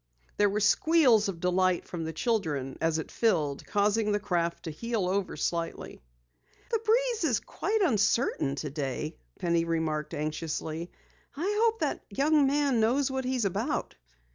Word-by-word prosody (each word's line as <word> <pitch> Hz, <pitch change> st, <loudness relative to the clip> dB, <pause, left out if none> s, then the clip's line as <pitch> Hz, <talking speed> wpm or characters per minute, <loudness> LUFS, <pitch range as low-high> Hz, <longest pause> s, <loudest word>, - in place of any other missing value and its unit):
There 205 Hz, 0 st, +4 dB
were 205 Hz, +2 st, -1 dB
squeals 250 Hz, -4 st, +4 dB
of 175 Hz, -4 st, -5 dB
delight 180 Hz, 0 st, +1 dB
from 165 Hz, -2 st, -5 dB
the 160 Hz, -, -3 dB
children 160 Hz, -, -1 dB
as 165 Hz, -1 st, +1 dB
it 160 Hz, -, -5 dB
filled, 155 Hz, -11 st, +1 dB
causing 210 Hz, +1 st, +1 dB
the 205 Hz, -, +1 dB
craft 170 Hz, -4 st, -1 dB
to 160 Hz, -, -4 dB
heel 225 Hz, +3 st, -2 dB
over 190 Hz, -3 st, -1 dB
slightly. 165 Hz, -, -3 dB, 0.7 s
"The 455 Hz, -, +2 dB
breeze 460 Hz, 0 st, +1 dB
is 245 Hz, -10 st, +2 dB
quite 430 Hz, +4 st, -2 dB
uncertain 215 Hz, -, +1 dB
today," 150 Hz, +1 st, -4 dB, 0.2 s
Penny 170 Hz, -2 st, +1 dB
remarked 160 Hz, -2 st, -2 dB
anxiously. 155 Hz, +2 st, -3 dB, 0.5 s
"I 385 Hz, +7 st, -1 dB
hope 455 Hz, 0 st, +1 dB
that -, -, -1 dB
young 290 Hz, 0 st, +3 dB
man 280 Hz, -3 st, +2 dB
knows 255 Hz, +5 st, +2 dB
what 265 Hz, -1 st, -2 dB
he 260 Hz, +1 st, 0 dB
is 240 Hz, -4 st, 0 dB
about." 190 Hz, -, -2 dB
200 Hz, 155 wpm, -29 LUFS, 165-265 Hz, 0.7 s, There